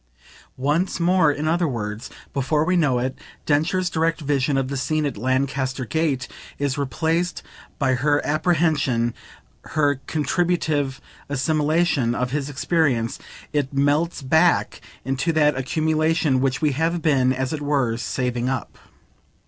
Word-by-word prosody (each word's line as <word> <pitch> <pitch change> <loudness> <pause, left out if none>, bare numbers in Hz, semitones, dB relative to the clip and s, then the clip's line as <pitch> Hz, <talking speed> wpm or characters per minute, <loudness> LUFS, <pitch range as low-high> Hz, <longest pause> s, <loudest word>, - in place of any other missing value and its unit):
Once 150 +9 0
more, 170 -2 +4
in 145 +2 -3
other 170 +1 +2
words, 110 -2 -4 0.2
before 150 +3 +1
we 180 +1 +2
know 145 -8 +2
it, 130 +2 -2 0.3
Densher's 165 +5 +1
direct 165 -1 0
vision 140 -2 0
of 135 -1 0
the 140 - -4
scene 155 +3 0
at 140 - -2
Lancaster 130 +2 -1
Gate 145 -2 -1 0.3
is 140 -2 -1
replaced 160 +6 -1 0.3
by 135 -2 +2
her 145 +3 +2
apprehension, 145 -7 +1 0.5
her 145 -3 0
contributive 155 -4 0 0.3
assimilation, 150 -2 +1
of 125 0 -1
his 145 0 -2
experience: 140 -5 0 0.3
it 145 -2 -1
melts 145 +3 +1
back 160 +6 +2 0.2
into 135 +5 0
that 150 -2 +3
accumulation, 155 0 +1
which 135 +2 0
we 150 - +3
have 165 +4 -1
been, 130 -5 +3
as 130 +2 -2
it 155 - -4
were, 140 -6 +1
saving 125 +1 -2
up. 130 -5 -4
145 Hz, 135 wpm, -22 LUFS, 130-160 Hz, 0.5 s, more